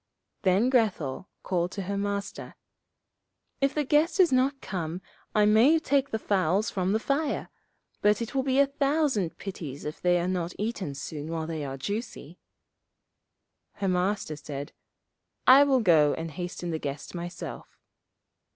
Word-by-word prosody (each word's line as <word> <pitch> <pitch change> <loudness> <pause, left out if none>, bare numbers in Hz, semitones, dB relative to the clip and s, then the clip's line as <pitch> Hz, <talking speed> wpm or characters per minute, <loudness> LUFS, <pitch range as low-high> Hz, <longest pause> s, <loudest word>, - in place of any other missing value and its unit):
Then 200 +7 +3
Grethel 195 - 0 0.2
called 180 -1 -1
to 200 - -4
her 200 +2 -3
Master, 200 0 -4 1.1
'If 275 0 +2
the 300 - +1
guest 300 +6 +2
does 370 -5 +5
not 265 +2 +2
come 175 -6 -4 0.4
I 210 -1 +5
must 250 +10 +5
take 280 0 +2
the 220 - -1
fowls 195 -1 +1
from 185 -1 0
the 215 - +2
fire; 285 +4 -1 0.5
but 210 0 +4
it 230 -2 -4
will 270 - +2
be 265 0 0
a 280 - +6
thousand 275 - 0
pities 155 -8 -7
if 150 - -6
they 175 0 +3
are 175 - -1
not 180 -1 -2
eaten 205 -9 -3
soon 150 +2 -6
while 165 -1 -2
they 160 -2 -4
are 135 -1 -5
juicy.' 205 - -5 1.3
Her 195 - -3
Master 180 -2 0
said, 145 -1 -7 0.7
'I 270 +3 +8
will 265 -3 +3
go 160 -7 +4
and 165 0 -5
hasten 175 +1 -5
the 160 - -2
guest 140 -1 -5
myself.' 175 0 -7
195 Hz, 155 wpm, -27 LUFS, 165-255 Hz, 1.3 s, I